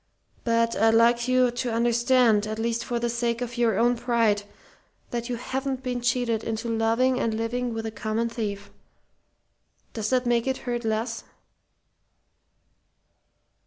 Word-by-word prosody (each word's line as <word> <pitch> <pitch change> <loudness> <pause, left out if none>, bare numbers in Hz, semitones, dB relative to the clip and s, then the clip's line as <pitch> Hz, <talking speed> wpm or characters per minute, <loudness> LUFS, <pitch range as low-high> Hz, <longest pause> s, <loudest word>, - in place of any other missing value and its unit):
But 230 0 +1
I'd 225 0 +4
like 235 +1 +4
you 255 -1 +3
to 245 0 -3
understand, 235 -1 +3
at 215 0 -4
least 230 +1 -1
for 240 - -2
the 235 0 -1
sake 235 0 -1
of 240 -1 -4
your 230 -4 +2
own 240 +1 +3
pride, 230 -4 +1 0.7
that 235 0 -3
you 245 - -1
haven't 265 +2 -3
been 250 -2 -2
cheated 240 -2 0
into 225 +1 -2
loving 235 +3 +2
and 225 -5 0
living 240 +2 -2
with 225 0 -4
a 220 - -3
common 215 +2 -2
thief. 205 -4 -5 1.2
Does 215 -2 -2
that 255 -1 +1
make 240 0 +1
it 265 0 0
hurt 240 -1 -2
less?" 225 +1 -2
235 Hz, 150 wpm, -25 LUFS, 225-245 Hz, 1.2 s, I'd